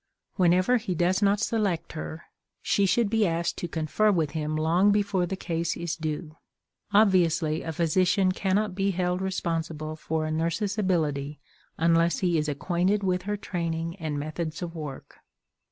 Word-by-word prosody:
Whenever 185 +6 +4
he 195 -6 -3
does 180 +4 +1
not 200 0 +3
select 200 -7 -1
her, 160 +1 -6 0.4
she 200 -1 +2
should 225 +4 +2
be 215 -1 +2
asked 170 0 -1
to 175 - -3
confer 165 +6 +1
with 160 -6 0
him 155 -1 -2
long 170 +6 +3
before 200 -3 +1
the 190 - -3
case 170 -2 -2
is 170 -1 -3
due. 155 0 -5 0.5
Obviously, 175 -6 +3
a 165 - -4
physician 180 +4 +2
cannot 195 +2 0
be 195 +1 0
held 180 -1 -1
responsible 165 -4 -3
for 155 0 -2
a 155 - -2
nurse's 170 +6 -1
ability 150 -7 0 0.4
unless 165 +1 +3
he 175 -3 +1
is 150 0 -1
acquainted 180 +7 0
with 180 -1 +1
her 205 - 0
training 170 -3 -3
and 155 -4 -3
methods 155 +3 -4
of 170 -1 -5
work. 150 -5 -8
170 Hz, 160 wpm, -27 LUFS, 160-190 Hz, 0.5 s, Whenever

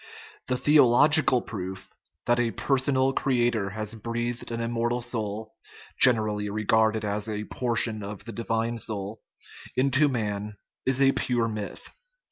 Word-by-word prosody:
The 125 - 0
theological 145 -1 +5
proof 95 -2 -7 0.3
that 120 0 +2
a 120 -1 +1
personal 135 +1 +1
creator 120 -7 +1
has 110 +2 -5
breathed 120 +2 -4
an 115 - -3
immor 115 0 -1
tal 120 +1 -1
soul 110 -2 -4 0.5
(generally 105 -4 +4
regarded 110 +1 +1
as 105 +1 -2
a 105 0 -3
portion 115 -2 -1
of 100 0 -7
the 115 - -7
divine 115 +1 -2
soul) 105 0 -5 0.5
into 135 +3 +3
man 105 -5 -3 0.3
is 135 +1 +2
a 135 - +6
pure 120 -3 0
myth. 105 -2 -6
115 Hz, 135 wpm, -26 LUFS, 105-125 Hz, 0.5 s, a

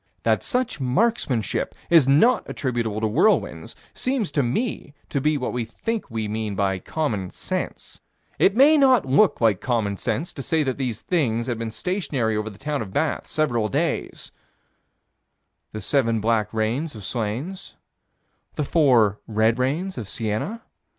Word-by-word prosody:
That - - +2
such 250 - -1
marksmanship 130 - 0 0.2
is 160 -6 +6
not 220 - +4
attributable 120 -5 -2
to 110 - +2
whirlwinds 165 - +1 0.2
seems 255 - -1
to 145 - +1
me 145 - -2
to 140 - -1
be 150 +1 +2
what 130 - -3
we 120 -1 -1
think 220 - -4
we 110 -2 -3
mean 105 -1 -3
by 95 -1 0
common 105 - -2
sense: - - -5 0.4
It 195 - +4
may 290 +5 +6
not 260 - +5
look 145 +10 +3
like 110 -5 +3
common 110 -5 0
sense 125 - -2
to 140 - -6
say 160 +3 +1
that 130 -1 -2
these 120 -4 -2
things 120 -10 0
had 120 -3 -3
been 115 -1 -3
stationary 130 - -2
over 105 +1 -2
the 100 - -13
town 150 +3 -3
of 100 -4 -6
Bath, 160 +8 -1
several 120 -8 0
days - - -2 1.4
The 110 - -6
seven 115 -5 +1
black 110 -1 +1
rains 115 +7 -1
of 105 - -9
Slains; 125 - -4 0.8
The 150 - -1
four 120 -10 +3
red 110 +2 +2
rains 155 +6 -1
of 105 -4 -6
Siena. 115 - -3
125 Hz, 155 wpm, -23 LUFS, 110-160 Hz, 1.4 s, is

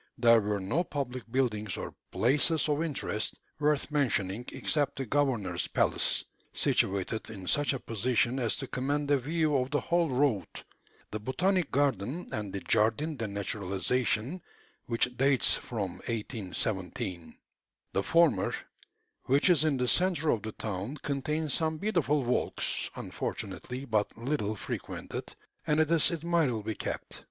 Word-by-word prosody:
There 115 -1 +6
were 105 0 -1
no 100 - +1
public 130 -7 -4
buildings 110 -6 0
or - - -5 0.2
places 150 +6 +3
of 150 0 +1
interest 140 -9 -2 0.2
worth 150 -1 +1
mentioning 120 -7 +1
except 145 -2 0
the 135 - -2
governor's 130 -5 0
palace, - - +1 0.3
situated 100 +3 +1
in 100 -4 -7
such 145 +9 +2
a 135 - -3
position 120 +3 +1
as 120 -3 +1
to 135 - -4
command 145 +3 -1
a 140 - +5
view 155 +2 +1
of 130 -1 +1
the 145 +1 +1
whole 170 -1 +1
road; 130 -6 +2 0.6
the 110 - -3
botanic 175 - +1
garden 140 - 0
and 105 -3 -2
the 100 - -4
"Jardin 115 +9 +2
de 115 -4 -3
Naturalisation," 105 - -1 0.5
which 125 +1 0
dates 135 0 +4
from 100 -6 -3 0.2
1817. 95 -6 -3 0.6
The 95 - +2
former, 165 +9 +3 0.7
which 140 +7 +4
is 160 -4 +4
in 155 -4 +2
the 125 0 0
centre 175 -1 +2
of 110 - 0
the 110 - -5
town, 105 +7 -4
contains 150 +1 -1
some 160 -1 +1
beautiful 155 -7 +1
walks, 125 +1 -1
unfortunately 130 +2 -4
but 110 -5 0
little 115 -4 -1
frequented, - - -5 0.3
and 150 +1 +3
it 155 0 +3
is 165 -3 +5
admirably 155 - 0
kept. - - -5
130 Hz, 140 wpm, -30 LUFS, 110-150 Hz, 0.7 s, There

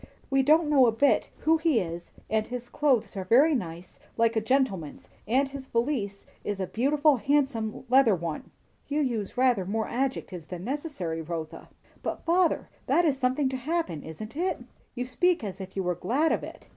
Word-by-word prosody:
We 270 0 +4
don't 310 +4 +4
know 275 -4 +5
a - - +4
bit 275 +6 +2
who 325 +1 +4
he 315 -7 +3
is; 170 -1 -5 0.2
and 215 0 0
his 245 -1 -6
clothes 270 -9 +1
are 190 - -3
very 265 - +5
nice, 175 - -5 0.2
like 230 0 +3
a 220 - +2
gentleman, 220 - 0 0.3
and 265 +5 +2
his 275 -1 -8
valise 230 -6 -1 0.2
is 205 -1 -3
a 190 - 0
beautiful, 285 - +2
handsome 260 -4 0
leather 250 -4 +5
one." 165 -3 -5 0.4
"You 295 +1 0
use 230 -8 -2
rather 250 -6 +3
more 220 +4 -2
adjectives 235 -10 -3
than 180 -1 -7
necessary, 250 - -3
Rotha." 160 -1 -6 0.3
"But, - - -4
father, 345 0 +2 0.2
that 345 - +3
is 280 -4 +1
something 260 +2 +1
to 260 - -3
happen, 285 - -2
isn't 215 - -8
it?" 360 +4 -1 0.3
"You 250 0 -2
speak 350 +5 +1
as 195 -2 -5
if 190 0 -9
you 195 - -1
were 180 0 0
glad 245 - +1
of - - 0
it." - - -10
245 Hz, 185 wpm, -27 LUFS, 195-285 Hz, 0.4 s, know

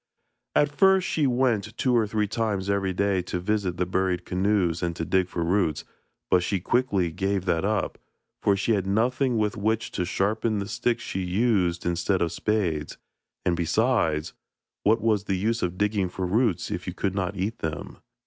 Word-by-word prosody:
At 145 0 +3
first 190 +2 +4
she 150 -3 +1
went 120 -4 0
two 125 -2 +2
or 115 -2 +3
three 105 0 0
times 100 -3 -1
every 100 -1 0
day 95 0 +1
to 90 0 -4
visit 95 -2 -1
the 90 - +1
buried 90 0 -1
canoes 90 -3 +1
and 85 -1 -1
to 80 - -3
dig 95 +1 +2
for 85 -2 -3
roots, 85 -4 +1 0.5
but 90 - +5
she 95 +2 -1
quickly 100 -4 +1
gave 95 +2 -1
that 85 -2 +1
up, 105 +1 -1 0.4
for 100 - +3
she 100 - 0
had 95 -3 0
nothing 125 +5 +1
with 105 +1 0
which 110 +2 0
to - - -2
sharpen 105 +4 0
the 100 -1 -3
sticks 120 +2 -1
she 95 - -3
used 90 -2 +1
instead 85 +2 +1
of 85 - -1
spades; 90 -9 -1 0.5
and 90 - +2
besides, 85 -3 +1 0.5
what 110 +2 +3
was 105 -3 +1
the 95 -2 0
use 115 +4 0
of 90 0 -2
digging 105 -2 +1
for 95 +1 -3
roots 105 0 +1
if - - -4
you - - -4
could 95 - -1
not 95 0 -2
eat 100 +5 -2
them? 75 -2 -5
100 Hz, 185 wpm, -26 LUFS, 90-110 Hz, 0.5 s, but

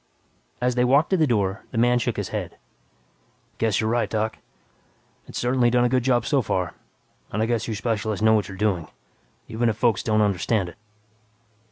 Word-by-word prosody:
As 125 0 +1
they 125 0 +2
walked 140 +8 +3
to 190 - +3
the 155 -3 +3
door, 100 -4 0
the 120 - -7
man 120 +1 +3
shook - - -2
his - - -3
head, - - -5 1.0
"Guess 110 -3 +1
you're 110 - 0
right, 120 0 +1
Doc. 110 0 -2 0.9
It's - - -7
certainly 125 0 +2
done 120 0 +3
a - - +2
good 130 +1 +2
job 120 -2 +2
so 140 +1 +2
far, 90 -5 -2 0.6
and 105 - -2
I 110 - +2
guess 115 -1 -1
you 110 - -2
specialists 110 -1 -2
know 110 0 +5
what 105 -2 +1
you're 95 - -9
doing, 95 -6 0 0.6
even 115 +1 0
if 110 - -2
folks 115 -3 +2
don't 110 -1 +1
understand 100 -1 +1
it." 85 - -15
115 Hz, 195 wpm, -24 LUFS, 105-120 Hz, 1.0 s, know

